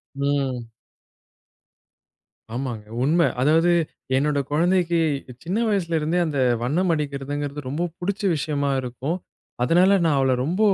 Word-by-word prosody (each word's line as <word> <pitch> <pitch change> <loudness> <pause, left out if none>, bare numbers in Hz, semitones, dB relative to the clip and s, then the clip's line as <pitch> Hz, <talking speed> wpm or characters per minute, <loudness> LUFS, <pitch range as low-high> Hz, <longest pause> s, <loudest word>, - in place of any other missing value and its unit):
ம். 135 -4 -1 1.9
ஆமாங்க, 120 -4 -4 0.2
உண்ம. 160 +6 +3 0.2
அதாவது 160 +5 +4 0.5
என்னோட 145 +1 +1
குழந்தைக்கு, 170 +2 +2 0.4
சின்ன 180 +6 -2
வயசுலேருந்தே 170 -4 0
அந்த 145 -3 -2 0.2
வண்ணம் 170 +8 +1
அடிக்கிறதுங்கிறது 145 -1 -3
ரொம்ப 150 +6 -2 0.2
புடிச்ச 200 +3 -2
விஷயமா 145 -1 -1
இருக்கும். 130 +7 -3 0.5
அதனால 180 +8 +5
நான் 150 -3 +3
அவள 135 -1 +2
ரொம்ப 175 +7 -2
150 Hz, 105 wpm, -23 LUFS, 140-170 Hz, 1.9 s, அதனால